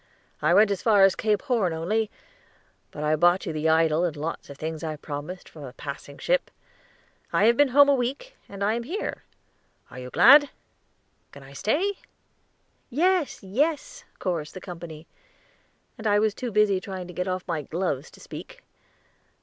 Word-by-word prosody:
"I 155 Hz, +4 st, +3 dB
went 205 Hz, +1 st, +5 dB
as 195 Hz, -, -2 dB
far 210 Hz, -4 st, +5 dB
as 195 Hz, -1 st, +5 dB
Cape 210 Hz, -2 st, 0 dB
Horn 230 Hz, -, +1 dB
only, 205 Hz, +7 st, -1 dB, 0.8 s
but 150 Hz, -, -7 dB
I 155 Hz, +1 st, +2 dB
bought 175 Hz, +4 st, +3 dB
you 165 Hz, -, -3 dB
the 155 Hz, +1 st, 0 dB
idol 160 Hz, 0 st, +3 dB
and 165 Hz, -4 st, -1 dB
lots 155 Hz, +3 st, -5 dB
of 140 Hz, -, -10 dB
things 160 Hz, +1 st, -5 dB
I 155 Hz, -1 st, -3 dB
promised 150 Hz, +5 st, -7 dB
from 155 Hz, -, -13 dB
a 130 Hz, -2 st, -9 dB
passing 140 Hz, 0 st, -8 dB
ship. -, -, 0 dB, 0.8 s
I -, -, +3 dB
have 235 Hz, +1 st, +5 dB
been 290 Hz, +3 st, +5 dB
home 285 Hz, +2 st, +6 dB
a 285 Hz, -, +5 dB
week, 275 Hz, -, -3 dB
and 200 Hz, 0 st, -5 dB
I 210 Hz, +2 st, +2 dB
am 235 Hz, -, -2 dB
here. 340 Hz, -, -4 dB, 0.7 s
Are 130 Hz, -, -9 dB
you 125 Hz, 0 st, -7 dB
glad? 285 Hz, -, +7 dB, 0.8 s
Can 140 Hz, -, -13 dB
I 135 Hz, +1 st, -14 dB
stay?" 345 Hz, -, 0 dB, 0.9 s
"Yes, 335 Hz, -, +1 dB
yes," 305 Hz, -, -1 dB
chorused 170 Hz, -4 st, -3 dB
the -, -, -6 dB
company, 170 Hz, -4 st, -9 dB, 0.9 s
and 220 Hz, -, -3 dB
I 205 Hz, 0 st, +4 dB
was 215 Hz, 0 st, +2 dB
too 245 Hz, +2 st, -5 dB
busy 205 Hz, -2 st, +3 dB
trying 185 Hz, -2 st, -6 dB
to 180 Hz, -, -10 dB
get 180 Hz, +2 st, -3 dB
off 185 Hz, 0 st, -3 dB
my 165 Hz, -4 st, -1 dB
gloves 155 Hz, -2 st, -3 dB
to -, -, -17 dB
speak. -, -, -10 dB
190 Hz, 180 wpm, -25 LUFS, 160-240 Hz, 0.9 s, glad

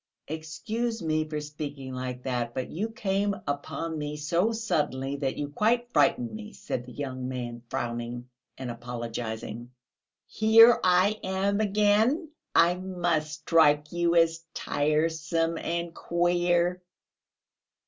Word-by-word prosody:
"Excuse 190 Hz, +9 st, -3 dB
me 155 Hz, -1 st, 0 dB
for 150 Hz, -1 st, -2 dB
speaking 145 Hz, -3 st, -6 dB
like 125 Hz, 0 st, -5 dB
that... 120 Hz, -2 st, -2 dB
but 130 Hz, -, -3 dB
you 205 Hz, +8 st, -2 dB
came 200 Hz, -2 st, 0 dB
upon 155 Hz, +3 st, -3 dB
me 150 Hz, 0 st, -4 dB
so 170 Hz, +8 st, +1 dB
suddenly 145 Hz, -11 st, -1 dB
that 135 Hz, -2 st, -2 dB
you 145 Hz, -1 st, -3 dB
quite 235 Hz, +9 st, +1 dB
frightened 240 Hz, -2 st, +3 dB
me," 215 Hz, 0 st, -8 dB
said 125 Hz, 0 st, -5 dB
the -, -, -9 dB
young 130 Hz, -1 st, -4 dB
man, 120 Hz, -2 st, -5 dB
frowning 120 Hz, +1 st, -4 dB, 0.3 s
and 130 Hz, -2 st, -4 dB
apologising. 115 Hz, -1 st, -5 dB, 0.6 s
"Here 225 Hz, +2 st, +6 dB
I 185 Hz, +4 st, +4 dB
am 195 Hz, +2 st, 0 dB
again. 215 Hz, -, +2 dB, 0.3 s
I 170 Hz, +1 st, +6 dB
must 175 Hz, -4 st, -1 dB
strike 150 Hz, -3 st, +4 dB
you 170 Hz, 0 st, +1 dB
as 165 Hz, 0 st, +3 dB
tiresome 160 Hz, +2 st, 0 dB
and 170 Hz, 0 st, -3 dB
queer." 175 Hz, +1 st, +1 dB
165 Hz, 125 wpm, -28 LUFS, 135-190 Hz, 0.6 s, Here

